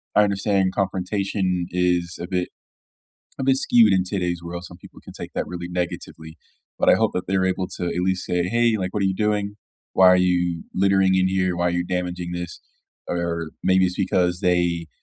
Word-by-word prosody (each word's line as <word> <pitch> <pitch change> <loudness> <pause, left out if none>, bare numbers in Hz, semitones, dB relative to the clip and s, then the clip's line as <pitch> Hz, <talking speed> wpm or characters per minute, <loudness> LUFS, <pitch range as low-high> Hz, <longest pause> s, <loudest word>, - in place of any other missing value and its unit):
I 105 - +6
understand 100 -1 +1
confrontation 95 -1 -1
is 90 -1 0
a 90 - -4
bit 90 -1 -2 0.9
a - - -1
bit 135 0 +4
skewed 115 -5 +4
in 95 -1 +3
today's 90 -2 -2
world, 85 +1 -6
some 90 - -12
people - - -15
can - - -12
take - - -8
that - - -2
really 85 -1 -6
negatively, 85 -2 -5 0.4
but - - +3
I - - +7
hope - - +1
that 90 - -2
they're 95 0 +1
able 95 0 0
to, 90 - -3
at 85 +1 -2
least, 95 0 0
say, 90 0 0
"Hey, 115 +4 +2
like, 95 -2 -3
what 105 - -1
are - - +2
you 95 -1 0
doing? 105 0 -1 0.4
Why 95 - +6
are 90 - +6
you 90 -2 +1
littering 95 0 +3
in 95 0 +3
here? 95 -1 0
Why 85 0 +1
are - - +2
you 90 0 0
damaging 90 -1 -3
this?" 85 -1 -5 0.5
or 85 -2 -2
maybe 95 0 +4
it's 90 - -2
because 90 -2 +1
they 85 -2 +1
90 Hz, 205 wpm, -23 LUFS, 90-95 Hz, 0.9 s, I